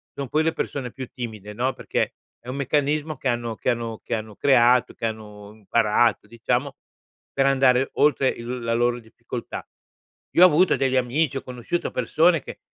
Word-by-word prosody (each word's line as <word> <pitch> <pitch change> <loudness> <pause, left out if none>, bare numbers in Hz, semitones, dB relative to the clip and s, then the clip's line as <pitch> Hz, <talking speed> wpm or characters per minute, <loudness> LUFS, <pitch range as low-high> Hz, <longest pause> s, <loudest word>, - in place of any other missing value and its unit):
son 140 -2 -5
quelle 160 +1 +1
persone 130 -4 -4
più 130 -1 -7
timide, 110 -6 -7
no, 125 +5 -1
perché - - -2 0.3
è 120 - -19
un 130 - -4
meccanismo 150 +2 0
che 135 - -4
hanno 120 -2 -2
che - - -2
hanno 115 -2 -4
che - - -2
hanno 110 -1 -6
creato, 125 -1 +4
che - - -5
hanno 105 -2 -8
imparato, 110 +2 +1
diciamo, 125 +4 -2 0.6
per 135 - +2
andare 135 -1 +3
oltre 140 -2 +3
il 120 +2 -5
la 115 0 -1
loro 120 +1 +1
difficoltà. 110 -1 -8 0.7
Io 175 - +7
ho - - +11
avuto 180 +2 +3
degli 130 -1 +1
amici, 130 +4 0
ho - - -6
conosciuto 125 +7 -4
persone 160 +6 +2
che - - -10
125 Hz, 175 wpm, -24 LUFS, 115-140 Hz, 0.7 s, ho